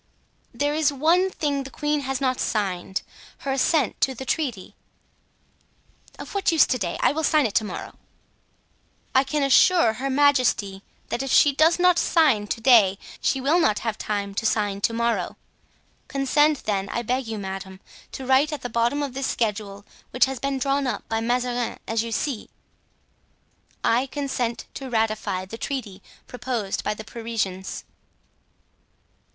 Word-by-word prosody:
"There 290 Hz, +1 st, -1 dB
is 305 Hz, -1 st, +2 dB
one 330 Hz, +7 st, +3 dB
thing 290 Hz, -6 st, -2 dB
the 270 Hz, -, -8 dB
queen 295 Hz, +1 st, -1 dB
has 270 Hz, -1 st, -3 dB
not 255 Hz, -2 st, 0 dB
signed—her 195 Hz, +6 st, -4 dB
assent 275 Hz, +2 st, +1 dB
to 265 Hz, -, +2 dB
the 265 Hz, -, -7 dB
treaty." 255 Hz, -, -3 dB, 1.4 s
"Of -, -, -9 dB
what 400 Hz, -3 st, +1 dB
use 325 Hz, -, +6 dB
to 255 Hz, -, -1 dB
day? 175 Hz, -5 st, -2 dB
I -, -, +4 dB
will 315 Hz, +2 st, -2 dB
sign 305 Hz, -2 st, +3 dB
it 215 Hz, -, -2 dB
to 220 Hz, -, +2 dB
morrow." 200 Hz, -4 st, -7 dB, 1.1 s
"I 265 Hz, -, +5 dB
can 285 Hz, +2 st, -1 dB
assure 275 Hz, -2 st, +5 dB
her 260 Hz, +5 st, -3 dB
majesty 255 Hz, -8 st, +2 dB, 0.3 s
that 240 Hz, -, -2 dB
if 270 Hz, -, -3 dB
she 290 Hz, -, +5 dB
does 315 Hz, +4 st, +4 dB
not 360 Hz, -1 st, +4 dB
sign 270 Hz, -11 st, +3 dB
to 230 Hz, -, -3 dB
day 220 Hz, -6 st, +5 dB, 0.2 s
she 270 Hz, -, +1 dB
will 290 Hz, +7 st, +2 dB
not 215 Hz, -10 st, +2 dB
have 220 Hz, -2 st, -2 dB
time 200 Hz, -1 st, -3 dB
to 225 Hz, -, -3 dB
sign 205 Hz, -2 st, 0 dB
to 230 Hz, -, +2 dB
morrow. 235 Hz, 0 st, -1 dB, 0.7 s
Consent, 290 Hz, +2 st, +2 dB
then, 195 Hz, -2 st, -1 dB
I 235 Hz, -, -2 dB
beg 250 Hz, +2 st, -1 dB
you, 220 Hz, -1 st, -4 dB
madame, 190 Hz, -1 st, -6 dB, 0.3 s
to 265 Hz, -, -6 dB
write 265 Hz, +4 st, +3 dB
at 295 Hz, -3 st, -5 dB
the 245 Hz, -, -3 dB
bottom 235 Hz, +5 st, 0 dB
of 275 Hz, -3 st, -4 dB
this 270 Hz, 0 st, -2 dB
schedule, 205 Hz, -3 st, -2 dB, 0.2 s
which 250 Hz, -, +3 dB
has 265 Hz, -2 st, -5 dB
been 275 Hz, +1 st, -1 dB
drawn 275 Hz, +1 st, 0 dB
up 250 Hz, -, -4 dB
by 225 Hz, -, 0 dB
Mazarin, 245 Hz, 0 st, -1 dB
as 225 Hz, -1 st, 0 dB
you 230 Hz, 0 st, -5 dB
see: 240 Hz, 0 st, -3 dB, 1.3 s
"'I 245 Hz, +4 st, +2 dB
consent 260 Hz, -4 st, -3 dB
to 270 Hz, -1 st, -7 dB
ratify 215 Hz, -5 st, -1 dB
the 225 Hz, +4 st, -9 dB
treaty 220 Hz, -9 st, -5 dB, 0.2 s
proposed 245 Hz, -5 st, -3 dB
by 210 Hz, -, -1 dB
the 220 Hz, -, -8 dB
Parisians. 220 Hz, -5 st, -4 dB
250 Hz, 165 wpm, -24 LUFS, 215-280 Hz, 1.4 s, use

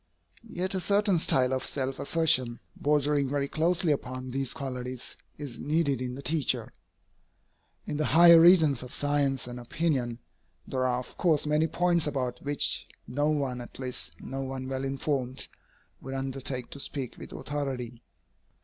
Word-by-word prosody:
Yet 185 Hz, -1 st, -2 dB
a 190 Hz, -, 0 dB
certain 200 Hz, -1 st, +3 dB
style 130 Hz, -4 st, +3 dB
of 130 Hz, -, -1 dB
self 135 Hz, -1 st, -3 dB
assertion, 130 Hz, -7 st, +2 dB, 0.2 s
bordering 145 Hz, -1 st, +1 dB
very 140 Hz, 0 st, 0 dB
closely 170 Hz, +2 st, +1 dB
upon 130 Hz, -2 st, -3 dB
these 135 Hz, 0 st, 0 dB
qualities, 125 Hz, -2 st, -5 dB, 0.2 s
is 140 Hz, -5 st, -7 dB
needed 145 Hz, -4 st, +1 dB
in 125 Hz, 0 st, -3 dB
the 140 Hz, -, -8 dB
teacher. 155 Hz, -2 st, 0 dB, 1.1 s
In 150 Hz, -, -3 dB
the 155 Hz, -, 0 dB
higher 170 Hz, +1 st, +8 dB
regions 160 Hz, -6 st, +6 dB
of 125 Hz, 0 st, -7 dB
science 145 Hz, -2 st, +1 dB
and 125 Hz, 0 st, -7 dB
opinion, 120 Hz, -2 st, -1 dB, 0.5 s
there 130 Hz, -1 st, 0 dB
are 125 Hz, -1 st, +1 dB
of -, -, -14 dB
course 160 Hz, -5 st, +3 dB
many 150 Hz, +2 st, +2 dB
points 175 Hz, -2 st, +2 dB
about 130 Hz, -4 st, -2 dB
which 145 Hz, 0 st, 0 dB, 0.2 s
no 145 Hz, +4 st, 0 dB
one, 135 Hz, -5 st, -1 dB
at 120 Hz, -, -10 dB
least 125 Hz, -, -2 dB
no 135 Hz, +1 st, -5 dB
one 130 Hz, -1 st, -5 dB
well 135 Hz, 0 st, -3 dB
informed, 135 Hz, -1 st, -2 dB, 0.5 s
would 135 Hz, +1 st, -6 dB
undertake 135 Hz, -1 st, -3 dB
to 140 Hz, -, -7 dB
speak 135 Hz, -2 st, -5 dB
with -, -, -9 dB
authority. 130 Hz, -5 st, -4 dB
135 Hz, 155 wpm, -28 LUFS, 130-150 Hz, 1.1 s, higher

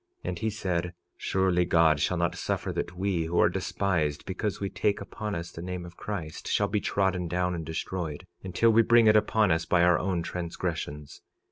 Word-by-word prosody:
46:18 -, -, -1 dB
And -, -, -4 dB
he 110 Hz, -, 0 dB
said: 90 Hz, -4 st, -2 dB, 0.2 s
Surely 95 Hz, -2 st, +1 dB
God 80 Hz, -3 st, +4 dB
shall 90 Hz, +5 st, +1 dB
not 85 Hz, 0 st, +1 dB
suffer -, -, -2 dB
that 90 Hz, -, -4 dB
we, 95 Hz, -3 st, 0 dB
who 85 Hz, +2 st, 0 dB
are -, -, +5 dB
despised 80 Hz, -7 st, -1 dB
because 95 Hz, +2 st, -3 dB
we 100 Hz, -, -2 dB
take 100 Hz, +1 st, 0 dB
upon 105 Hz, -2 st, -5 dB
us 85 Hz, +1 st, -5 dB
the 85 Hz, -, -8 dB
name 90 Hz, 0 st, -5 dB
of 85 Hz, -, -11 dB
Christ, 85 Hz, -7 st, -6 dB
shall 100 Hz, -, +2 dB
be 105 Hz, 0 st, -1 dB
trodden 95 Hz, -3 st, 0 dB
down 90 Hz, +1 st, 0 dB
and 85 Hz, -2 st, -4 dB
destroyed, 80 Hz, -1 st, -4 dB, 0.2 s
until 95 Hz, +5 st, +3 dB
we 115 Hz, +1 st, +6 dB
bring 115 Hz, 0 st, +5 dB
it 110 Hz, 0 st, +6 dB
upon 105 Hz, -2 st, +3 dB
us 80 Hz, +1 st, +1 dB
by 90 Hz, -1 st, +3 dB
our 90 Hz, 0 st, +5 dB
own 90 Hz, -2 st, -1 dB
transgressions. 85 Hz, -4 st, -4 dB
90 Hz, 205 wpm, -28 LUFS, 85-100 Hz, 0.2 s, we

